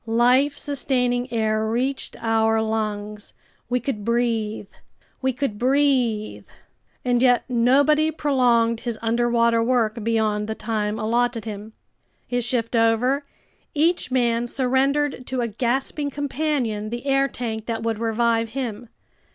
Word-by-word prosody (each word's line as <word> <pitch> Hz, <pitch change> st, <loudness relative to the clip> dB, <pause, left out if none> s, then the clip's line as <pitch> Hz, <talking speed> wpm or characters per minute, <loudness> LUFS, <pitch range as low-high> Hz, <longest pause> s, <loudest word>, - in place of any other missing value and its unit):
Life 250 Hz, +5 st, +3 dB
sustaining 250 Hz, -3 st, 0 dB
air 220 Hz, -2 st, 0 dB
reached 250 Hz, +5 st, -2 dB
our 225 Hz, 0 st, +2 dB
lungs! 210 Hz, -1 st, -3 dB, 0.3 s
We 250 Hz, 0 st, +1 dB
could 240 Hz, -4 st, -4 dB
breathe! 225 Hz, -3 st, -1 dB, 0.5 s
We 265 Hz, 0 st, +1 dB
could 250 Hz, -5 st, -3 dB
breathe! 255 Hz, -5 st, +1 dB, 0.6 s
And 245 Hz, -1 st, +2 dB
yet 245 Hz, -2 st, +4 dB
nobody 275 Hz, +6 st, +3 dB
prolonged 245 Hz, -7 st, +2 dB
his 235 Hz, -2 st, -4 dB
underwater 235 Hz, 0 st, +2 dB
work 230 Hz, -2 st, 0 dB
beyond 215 Hz, -2 st, 0 dB
the 220 Hz, -, -3 dB
time 215 Hz, -1 st, -2 dB
allotted 235 Hz, +1 st, 0 dB
him. 215 Hz, 0 st, -7 dB, 0.5 s
His 245 Hz, -1 st, -1 dB
shift 235 Hz, -1 st, -1 dB
over, 240 Hz, +5 st, +2 dB, 0.5 s
each 330 Hz, +2 st, +1 dB
man 240 Hz, -2 st, +1 dB
surrendered 265 Hz, +1 st, 0 dB
to 260 Hz, -1 st, -2 dB
a 235 Hz, -, 0 dB
gasping 265 Hz, +6 st, -1 dB
companion 275 Hz, -7 st, -2 dB
the 240 Hz, +3 st, -6 dB
air 275 Hz, 0 st, +2 dB
tank 225 Hz, -4 st, -5 dB
that 225 Hz, -1 st, -3 dB
would 225 Hz, -2 st, -1 dB
revive 230 Hz, 0 st, 0 dB
him. 240 Hz, -3 st, -4 dB
235 Hz, 125 wpm, -23 LUFS, 225-260 Hz, 0.6 s, yet